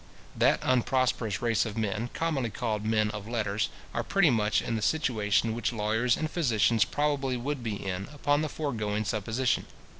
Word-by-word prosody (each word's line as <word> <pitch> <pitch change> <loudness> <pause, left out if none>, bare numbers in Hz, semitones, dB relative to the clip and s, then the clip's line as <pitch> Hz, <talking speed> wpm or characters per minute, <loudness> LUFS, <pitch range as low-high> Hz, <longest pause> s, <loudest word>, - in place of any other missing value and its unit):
That - - +4
unprosperous 125 -4 +1
race 115 -3 +2
of 110 -1 -5
men, 110 +2 -1
commonly 150 -8 0
called 110 -2 -2
men 110 -1 +1
of 105 -1 -7
letters, 110 -2 -1 0.2
are 120 - 0
pretty 175 - +3
much 110 -2 +2
in 115 - -2
the 110 - -2
situation 110 -7 +1
which 115 +1 -1
lawyers 110 +2 +1
and 155 - -1
physicians 120 - +2
probably 140 -3 0
would 140 +2 -3
be 110 -3 -2
in, 95 -1 -4
upon 145 0 +1
the 155 - -1
foregoing 110 -9 -2
supposition. 110 +4 0
115 Hz, 170 wpm, -28 LUFS, 105-130 Hz, 0.2 s, That